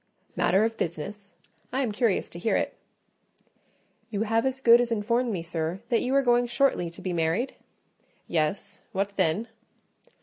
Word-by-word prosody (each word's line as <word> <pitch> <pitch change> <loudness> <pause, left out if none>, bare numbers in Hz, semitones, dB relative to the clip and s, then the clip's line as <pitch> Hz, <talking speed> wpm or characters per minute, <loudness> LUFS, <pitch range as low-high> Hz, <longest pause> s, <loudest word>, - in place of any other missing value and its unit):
"Matter 195 +3 +3
of 225 0 -2
business? 195 +5 -5 0.4
I 260 +2 0
am 245 -5 0
curious 215 -2 +1
to 170 - -8
hear 220 - +1
it." - - 0 1.4
"You 215 -1 -1
have 225 +3 +1
as 265 0 -2
good 235 -2 +7
as 240 -1 -2
informed 235 +3 +1
me, 180 -5 -3
sir, 165 +1 -3
that 235 - +2
you 260 +2 0
are 275 - +4
going 245 -1 +3
shortly 240 -8 +1
to 170 +3 -13
be 185 -2 -2
married?" 170 +10 0 0.7
"Yes; 160 +3 -1
what 200 +1 -1
then?" 195 +9 +1
210 Hz, 165 wpm, -27 LUFS, 175-240 Hz, 1.4 s, good